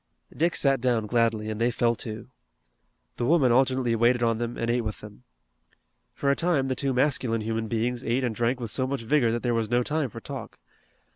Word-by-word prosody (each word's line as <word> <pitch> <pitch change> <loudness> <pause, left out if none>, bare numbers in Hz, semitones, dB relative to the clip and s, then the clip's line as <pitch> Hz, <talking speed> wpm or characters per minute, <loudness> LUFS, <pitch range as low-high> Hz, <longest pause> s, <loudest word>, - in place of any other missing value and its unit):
Dick 170 +2 +1
sat 135 -3 +2
down 120 -3 +1
gladly, 115 -1 +1
and 110 +1 -4
they 120 - +3
fell 120 -1 +1
to. 110 0 -7 0.9
The 120 - -1
woman 145 -6 +4
alternately 130 -1 +2
waited 120 +1 +3
on 115 -1 +1
them 120 0 -3
and 115 - -2
ate 120 +1 +1
with 110 -2 -5
them. 105 -1 -13 0.9
For 140 - +1
a - - +2
time 155 -6 +1
the 130 - 0
two 135 +1 -1
masculine 125 -3 +1
human 110 +1 -2
beings 120 +2 -1
ate 125 +3 0
and 120 -3 -1
drank 120 +3 0
with 115 -4 -4
so 130 +3 0
much 135 -3 -3
vigor 120 -1 +2
that 120 +1 -2
there 120 -1 +1
was 115 -2 -1
no 120 +1 +2
time 150 0 -1
for 115 - -9
talk. 135 0 -8
120 Hz, 215 wpm, -26 LUFS, 115-130 Hz, 0.9 s, woman